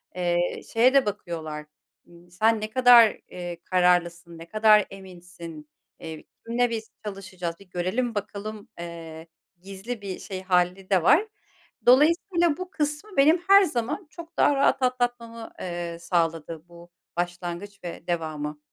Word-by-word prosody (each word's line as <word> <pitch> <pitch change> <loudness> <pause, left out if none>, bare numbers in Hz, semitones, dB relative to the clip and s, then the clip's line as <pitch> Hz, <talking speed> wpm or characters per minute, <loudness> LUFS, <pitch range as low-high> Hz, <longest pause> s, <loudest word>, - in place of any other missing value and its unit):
eee, 175 -1 0
şeye 245 +3 +5
de 275 -1 +5
bakıyorlar, 160 -7 -5 0.4
ııı, 175 0 -19
sen 215 +4 +2
ne 215 - -3
kadar, 245 -3 +7
eee, 175 -1 -7
kararlısın, 175 -2 +1
ne 165 - -10
kadar 215 0 +5
eminsin, 175 -5 -11 0.3
eee, 160 -2 -8 0.2
kimle 240 +1 +1
biz 225 -1 -5
çalışacağız, 190 -4 -5
bir 195 - -17
görelim 190 +7 -2
bakalım, 210 +1 -6
eee, 165 -1 -8 0.3
gizli 195 +4 -7
bir 195 -2 -6
şey 190 -2 -6
hâli 185 0 +1
de 190 -4 +3
var. 335 - +5 0.6
Dolayısıyla 335 +5 +4
bu 370 0 -6
kısmı 300 +7 -3
benim 315 +5 +5
her 395 0 +9
zaman 295 - -2
çok 335 0 -12
daha 290 - +4
rahat 275 0 +2
atlatmamı, 240 -2 -2
eee, 175 -1 -5
sağladı 165 -2 -1
bu 170 0 -15 0.3
başlangıç 175 +3 -4
ve 175 - -8
devamı. 155 -3 -3
190 Hz, 140 wpm, -25 LUFS, 175-240 Hz, 0.6 s, her